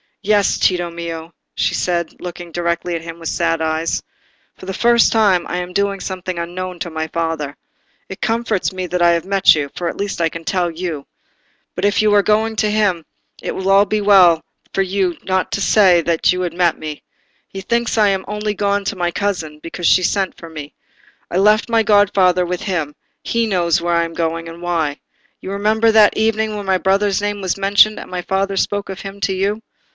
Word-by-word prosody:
"Yes, 205 0 +2
Tito 175 -2 +1
mio," 170 -1 -7 0.2
she - - 0
said, 170 -2 -2
looking 175 -1 -8
directly 170 0 -2
at 165 - -4
him 165 0 -8
with 165 - -4
sad 165 -1 0
eyes. 160 +1 -1 0.5
"For 185 - -12
the 190 - -3
first 235 +3 +4
time 200 -6 +3
I 180 - -3
am 180 0 -5
doing 200 +1 0
something 185 -2 -5
unknown 180 +2 -5
to 170 - -5
my 160 0 -3
father. 160 -3 -3 0.5
It 190 - -9
comforts 225 -3 0
me 185 -1 -4
that 180 +1 -2
I 170 0 +5
have 170 0 0
met 195 -3 +5
you, 145 -2 -2
for 175 -1 -2
at - - -7
least 200 -3 -3
I 165 - +2
can 165 +1 -8
tell 180 0 0
you. 165 -4 -5 0.7
But 180 - -1
if 205 +1 +2
you 210 -1 +3
are 205 - +6
going 220 +2 +1
to 215 - +1
him, 205 -6 +1 0.4
it - - -4
will 195 +1 +3
be 215 +1 -1
well 185 -5 +5 0.3
for 195 - +2
you 190 -2 -1
not 185 -1 -1
to 200 - -1
say 190 -5 +5
that 165 0 +2
you 180 0 -1
met 175 0 +1
me. 155 -1 -7 0.4
He 195 - -8
thinks 235 +3 -1
I 210 -2 +4
am 190 -1 -1
only 210 0 -2
gone 200 0 0
to 200 - -2
my 175 -2 -1
cousin, 170 -5 -3
because 165 +1 -3
she 185 - +4
sent 195 0 0
for 165 - -10
me. 150 -2 -9 0.6
I 175 - -1
left 210 +3 +4
my 230 -1 +3
godfather 195 -4 +3
with 180 0 -3
him: 160 -7 -3 0.3
he 230 -1 0
knows 175 -5 +1
where 170 0 0
I 170 - +2
am 165 - -8
going, 165 0 -2
and 165 +1 -11
why. 165 -5 -1 0.4
You 190 - -6
remember 215 +3 +2
that 215 -1 +5
evening 220 0 0
when 205 -1 -5
my 190 -1 +2
brother's 195 +1 +1
name 205 0 -2
was 185 0 -1
mentioned 200 +2 +4
and - - -10
my 180 -1 -4
father 195 +2 -1
spoke 205 +1 -1
of 190 - -6
him 195 0 -8
to 195 - 0
you?" 200 +3 -1
185 Hz, 210 wpm, -18 LUFS, 170-205 Hz, 0.7 s, are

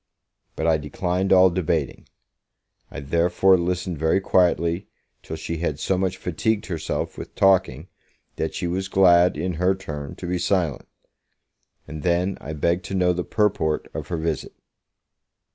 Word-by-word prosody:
But 80 - -3
I 80 -1 +3
declined 90 +5 -2
all 95 -1 +6
debating. 80 -5 -2 0.8
I - - -7
therefore 85 +6 +3
listened 90 -1 -2
very 80 +4 +2
quietly, 90 -1 +1 0.3
till 80 - -7
she 80 +1 -5
had 80 -3 -2
so 95 - 0
much 95 0 -1
fatigued 100 +5 -1
herself 85 -5 -4
with - - -9
talking, 95 -6 +2 0.5
that - - -3
she - - -3
was 95 +3 -2
glad, 90 -3 +4
in 90 +4 -2
her 95 +1 +3
turn, 75 -7 -7
to - - -8
be 90 0 -1
silent. 85 -6 0 1.0
And 80 0 -7
then, 90 +3 0
I 80 - -6
begged 85 +4 0
to 95 - -4
know 90 -1 +3
the 90 0 -2
purport 95 -8 0
of - - -5
her 85 - -3
visit. 80 -2 -3
90 Hz, 155 wpm, -23 LUFS, 80-95 Hz, 1.0 s, all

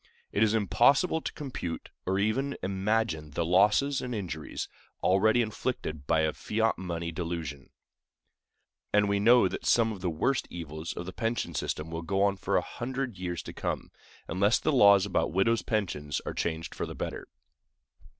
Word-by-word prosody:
It 100 - 0
is 110 0 +4
impossible 140 - +3
to - - -4
compute 125 - -5 0.2
or 95 +1 +1
even 130 +8 0
imagine 95 -4 0
the 80 +3 -2
losses 105 +10 +3
and 125 -1 -4
injuries 85 -7 -4 0.4
already 110 +6 +4
inflicted 105 - -4
by 80 -1 +3
the 80 -1 +1
fiat 110 +1 0
money 85 -2 -3
delusion; 80 -5 -5 1.2
and 105 0 +4
we 100 0 +1
know 120 +4 +6
that - - -5
some 115 -1 +4
of 100 -4 -7
the 90 - 0
worst 120 - 0
evils 80 -1 -6
of 85 - -6
the 95 - -7
pension 115 -7 -2
system 75 +3 -3
will 80 0 -3
go 95 +4 0
on 100 -1 +3
for - - 0
a - - +3
hundred 125 -3 -4
years 90 -2 -3
to - - -8
come, - - -3 0.4
unless 100 +6 +3
the - - 0
laws 100 -6 +7
about 95 -4 0
widows' 110 +5 +3
pensions 80 -10 -2
are - - -3
changed 80 -1 -3
for - - -4
the - - -7
better. - - -5
100 Hz, 170 wpm, -29 LUFS, 85-115 Hz, 1.2 s, laws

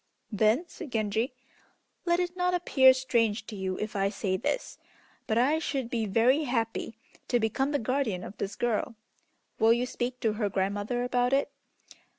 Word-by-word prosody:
"Then," 220 - +2
said 320 -4 -9
Genji, 220 +3 -1 0.7
"let 345 0 +3
it 355 0 -2
not 360 0 +1
appear 265 -7 +6
strange 235 -4 0
to 215 - -8
you 190 -1 -3
if 215 0 -4
I 195 0 +1
say 195 -2 -2
this, - - -3 0.5
but 220 - +1
I 285 +6 +3
should 270 -6 -3
be 225 -3 -1
very 245 +9 +3
happy 230 -3 -2 0.3
to 245 - +2
become 250 +5 0
the 290 - +2
guardian 235 -7 -1
of 200 - -8
this 200 0 -3
girl. 230 0 -1 0.6
Will 225 +1 +6
you 240 +1 0
speak 250 0 -4
to 220 -2 +1
her 210 -1 -1
grandmother 205 +5 -1
about 250 +1 +1
it? 280 +1 +2
235 Hz, 170 wpm, -28 LUFS, 215-265 Hz, 0.7 s, appear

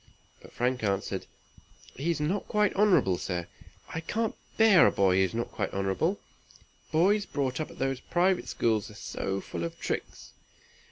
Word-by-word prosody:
But - - -14
Frank 125 +1 -1
answered, 100 -2 -1 0.7
"He 145 +6 -2
is 165 - 0
not 175 +7 -1
quite 210 -1 +2
honorable, 190 - +3
sir. 90 -2 -3 0.4
I 160 - -4
can't 220 +7 -1 0.2
bear 220 -6 +7
a - - +3
boy 95 -2 +3
who - - +4
is 95 +4 0
not 115 - -2
quite - - -2
honorable. 100 - 0 0.7
Boys 195 +6 +3
brought 135 -3 -2
up 155 - -4
at - - -13
those 135 -1 -1
private 180 +4 +1
schools 110 -3 0
are 105 - -13
so 95 -1 -3
full 85 - -5
of 85 - -5
tricks!" - - -4
135 Hz, 170 wpm, -29 LUFS, -, 0.7 s, bear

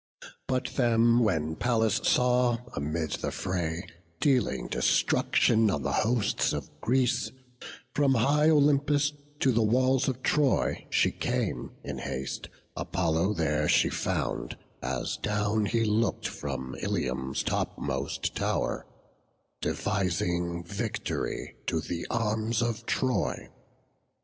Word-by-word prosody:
But 130 -1 0
them 115 -1 +4
when 80 -9 +1
Pallas 115 -3 +2
saw, 125 -1 +3 0.2
amid 75 +2 -2
the - - -2
fray 85 -2 -2 0.3
Dealing 130 -7 +2
destruction 110 -1 +3
on 75 -8 -1
the - - -1
hosts 110 -2 +1
of - - -5
Greece, 130 0 +1 0.6
From 140 -2 +3
high 145 +6 +4
Olympus 145 -1 +3 0.3
to 135 - +4
the 115 -1 +2
walls 130 +4 +3
of 130 -1 -2
Troy 145 -4 +1
She - - +3
came - - -2
in - - -5
haste; 65 +1 -4 0.3
Apollo 85 +3 0
there 75 -3 +1
she - - +4
found, - - -2 0.2
As - - -2
down 105 0 0
he 115 +3 +1
look'd 110 +2 +1
from 65 0 -5
Ilium's 65 +1 -1
topmost - - -2
tow'r, - - -1 0.7
Devising 90 -3 -1
vict'ry 85 - -3
to 80 - +1
the 85 +1 -4
arms 110 0 0
of 115 -1 -3
Troy. 125 -9 0
110 Hz, 115 wpm, -28 LUFS, 85-125 Hz, 0.7 s, them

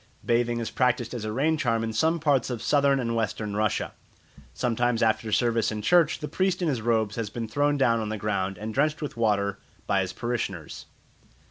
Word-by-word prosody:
Bathing 120 0 +1
is 115 - -3
practised 125 -2 +1
as 115 -3 -4
a 110 - -2
rain 150 +7 +1
charm 115 -4 +1
in 110 0 -3
some 160 +9 +2
parts 145 -5 +2
of 120 -3 -4
Southern 140 -1 +3
and 115 -2 -1
Western 105 -2 -2
Russia. 105 -1 0 0.6
Sometimes 120 - 0
after 110 0 +1
service 115 0 +2
in 105 -1 -4
church 170 +3 +4
the 150 - -3
priest 185 +1 0
in - - +1
his 130 -7 0
robes 110 -2 0
has 115 -3 -2
been 115 +1 -5
thrown 145 +5 +1
down 115 -4 +3
on 110 -1 -3
the 110 - -3
ground 100 -2 -2
and 110 +2 -5
drenched 150 +4 +1
with 145 - -5
water 100 -3 0 0.3
by 100 -1 +2
his 95 -1 -3
parishioners. 105 -10 -4
115 Hz, 205 wpm, -26 LUFS, 110-135 Hz, 0.6 s, church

